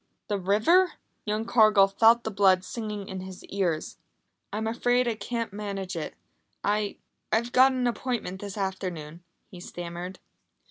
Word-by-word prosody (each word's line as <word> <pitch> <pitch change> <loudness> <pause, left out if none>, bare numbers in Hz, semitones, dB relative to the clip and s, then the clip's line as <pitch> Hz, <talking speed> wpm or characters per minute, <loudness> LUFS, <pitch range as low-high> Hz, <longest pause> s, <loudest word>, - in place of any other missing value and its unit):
The 205 -1 0
river! 220 - +4 0.3
Young 215 +1 -1
Cargill 215 -4 +6
felt 230 +4 +5
the 220 - -3
blood 190 -2 +4
singing 210 0 -5
in 190 - -5
his 185 0 -9
ears. 180 -6 -2 0.5
"I'm 215 +1 -2
afraid 245 +2 +2
I 235 - +1
can't 225 0 -4
manage 200 -3 -4
it. 160 - -4 0.5
I 205 0 0 0.3
I've 235 +2 +1
got 260 +2 +6
an 255 -1 -1
appointment 235 -6 -2
this 200 0 -6
afternoon," 180 -4 -4 0.3
he 180 - -10
stammered. 175 +1 -7
205 Hz, 145 wpm, -27 LUFS, 190-230 Hz, 0.5 s, Cargill